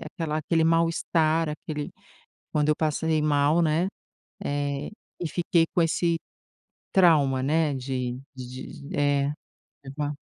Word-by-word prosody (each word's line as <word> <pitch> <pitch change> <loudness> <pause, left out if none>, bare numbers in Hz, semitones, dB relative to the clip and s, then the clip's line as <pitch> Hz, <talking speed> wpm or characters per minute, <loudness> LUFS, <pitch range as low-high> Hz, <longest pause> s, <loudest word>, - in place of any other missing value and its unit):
aquela 160 -4 -3
aquele 160 +1 +1
mal-estar, 165 -1 +2
aquele 150 -1 -5 0.6
quando 150 0 +2
eu 150 - +2
passei 155 0 0
mal, 150 +2 +3
né, 160 +3 +2 0.6
eh, 145 0 -2 0.3
e 175 - -2
fiquei 170 0 +2
com 175 - +4
esse 165 +1 +1 0.8
trauma, 145 -8 +4
né, 155 0 +2
de 125 -1 -3
de 130 +2 -9
de - - -4
é. 145 0 +2 0.5
Teve 135 0 -9
uma 145 0 -1
150 Hz, 130 wpm, -26 LUFS, 140-165 Hz, 0.8 s, com